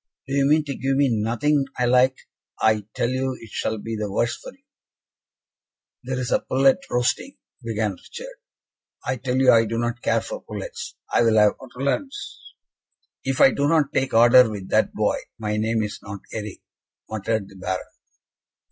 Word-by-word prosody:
"Do 135 - -6
you 140 0 +3
mean 155 +1 +4
to 145 -2 -4
give 135 0 0
me 140 -1 +3
nothing 120 +6 +1
I 125 - +1
like? 125 +1 +4 0.4
I 110 -2 +2
tell 120 - 0
you 130 0 -1
it 115 -3 -13
shall 110 - -2
be 115 +2 -5
the 105 -2 -3
worse 120 +4 0
for - - -10
you." - - -25 1.4
"There 130 0 -4
is 125 -1 -3
a - - +4
pullet 135 +5 +3
roasting," 125 - 0 0.2
began 110 -3 -1
Richard. 480 - -10 0.7
"I 130 - -1
tell 125 +1 -2
you, 130 -1 +6
I 115 0 +5
do 115 +1 -3
not 120 0 -2
care - - +1
for - - -7
pullets 210 - -7 0.2
I - - +4
will 115 -2 +4
have 105 -1 +5
ortolans." 140 - -3 1.1
"If 135 -1 -1
I 135 - +8
do 140 +2 0
not 150 -2 +2
take 135 -3 0
order 120 +1 +7
with 100 -3 -7
that - - +2
boy, - - 0 0.2
my 105 -1 -2
name 110 +1 +1
is 105 - -5
not 100 -1 -8
Eric," 105 -2 -6 0.4
muttered 110 -1 -2
the 95 - -16
Baron. 95 0 -3
120 Hz, 180 wpm, -23 LUFS, 110-135 Hz, 1.4 s, I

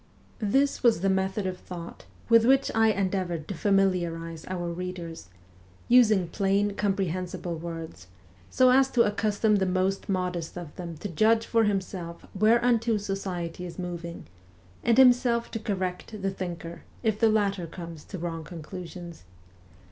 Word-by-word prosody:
This 270 +6 +1
was 235 -8 +4
the 195 0 +2
method 190 +1 0
of 185 -1 -3
thought 175 -2 -9 0.2
with 230 -1 +6
which 270 +3 +4
I 225 0 +4
endeavoured 185 -6 -1
to - - -2
familiarize 170 -4 0
our 175 -2 -3
readers 175 - -6 0.6
using 215 -7 +5
plain 200 +2 +1
comprehensible 185 -3 -2
words, 165 - -7 0.4
so 255 0 +5
as 265 +1 +5
to 235 - +5
accustom 210 0 +1
the 190 -1 +1
most 185 +2 0
modest 180 -3 -2
of 170 -4 -8
them 170 -3 -7
to - - -3
judge 220 +6 +3
for 230 -1 +2
himself 190 -4 -3
whereunto 230 +2 +3
society 190 -4 -4
is 175 -1 -7
moving, 170 -2 -6 0.6
and 235 0 +3
himself 245 -2 +5
to 225 - -3
correct 190 0 -3
the 195 - +1
thinker 170 -3 -6 0.2
if 220 -2 +1
the 225 - +5
latter 200 -5 +1
comes 165 -2 -9
to 195 - -7
wrong 165 -1 -4
conclusions. 170 - -9
190 Hz, 145 wpm, -27 LUFS, 170-215 Hz, 0.6 s, with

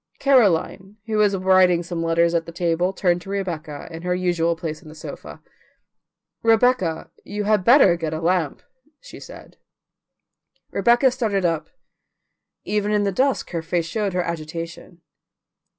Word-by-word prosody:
Caroline, 205 - +2
who 220 -2 -2
was 205 -2 +3
writing 185 -2 +4
some 175 -1 -5
letters 165 +1 +2
at 165 -1 -1
the - - -7
table, 175 +1 0
turned 175 -2 0
to 195 - -12
Rebecca, 165 -7 -5
in 165 0 -8
her 180 +1 -1
usual 175 -2 0
place 160 -2 -6
on 155 - -14
the 155 - -12
sofa. 155 - -10 1.0
"Rebecca, 225 -8 +2
you 210 0 -4
had 210 -2 +2
better 235 -6 +6
get 160 -2 -3
a 155 - -3
lamp," 170 -2 -1 0.4
she - - -12
said. - - -13 1.1
Rebecca 240 +2 +3
started 215 -7 -1
up; 165 -2 -1 0.9
even 210 0 -1
in 210 -1 +2
the 200 - 0
dusk 265 +7 0
her 170 -2 -2
face 165 +1 -2
showed 205 +2 -2
her 180 0 0
agitation. 165 +1 -7
180 Hz, 150 wpm, -22 LUFS, 165-205 Hz, 1.1 s, better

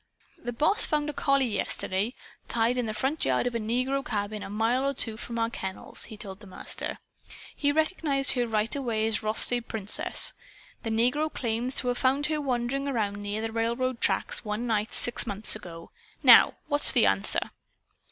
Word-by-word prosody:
"The 245 - -3
Boss 300 - +3
found 300 -1 0
a - - -17
collie 275 -1 +2
yesterday, 210 -1 -2 0.3
tied 235 +2 +1
in 240 - -1
the 215 - -3
front 265 +8 -1
yard 130 - +1
of 245 - -1
a 230 - -1
negro 255 +5 -1
cabin 210 -5 -3
a - - -7
mile 230 +6 +1
or 275 - -1
two 225 -3 -1
from 235 +1 -6
our 230 0 0
kennels," 190 -5 -4
he 215 -1 -10
told 195 -2 -8
the 210 - -13
Master. 185 - -3 0.6
"He 285 -1 +1
recognized 305 -3 +1
her 245 -2 0
right 220 +2 0
away 230 -6 -1
as 220 -1 0
Rothsay 220 +3 +2
Princess. 220 -3 +1 0.5
The 225 - -4
negro 250 +8 +1
claims 240 +2 -2
to 250 - +4
have 245 - -1
found 270 +3 +2
her 305 0 -1
wandering 265 +1 -1
around 215 -7 -1
near 205 +2 -3
the 225 - -3
railroad 235 +2 -1
tracks, - - 0
one 210 +2 -3
night, 220 -1 0
six 240 0 -1
months 205 +1 +1
ago. 170 -5 -10 0.3
Now, - - +8
what's 290 -1 +6
the - - +4
answer?" 95 0 0
235 Hz, 185 wpm, -27 LUFS, 215-270 Hz, 0.6 s, Now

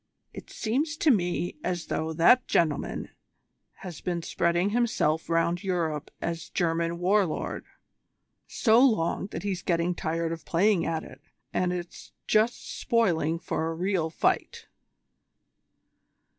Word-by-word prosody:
"It - - -10
seems 290 +7 -1
to 310 - +4
me 175 -5 0
as 180 -2 -2
though 160 +1 -2
that 170 +10 +5
gentleman 155 -4 0 0.8
had 175 -4 -8
been 175 -2 -2
spreading 175 +5 +1
himself 215 -10 +1
round 170 +2 +1
Europe 165 -6 -1
as 165 -1 -4
German 170 -1 0
War 195 +4 +3
Lord 155 - -4 0.8
so 225 -1 +3
long 215 -8 +2
that - - -6
he's 190 -3 -2
getting 170 0 0
tired 165 0 -2
of 165 -1 -5
playing 190 +2 +2
at 160 -1 -2
it, - - -13 0.3
and 180 -1 +1
's 175 -1 -7
just 220 +3 +1
spoiling 170 -9 +1
for 160 -1 -2
a 165 - -3
real 180 -2 0
fight." 160 - -1
175 Hz, 130 wpm, -27 LUFS, 165-205 Hz, 0.8 s, that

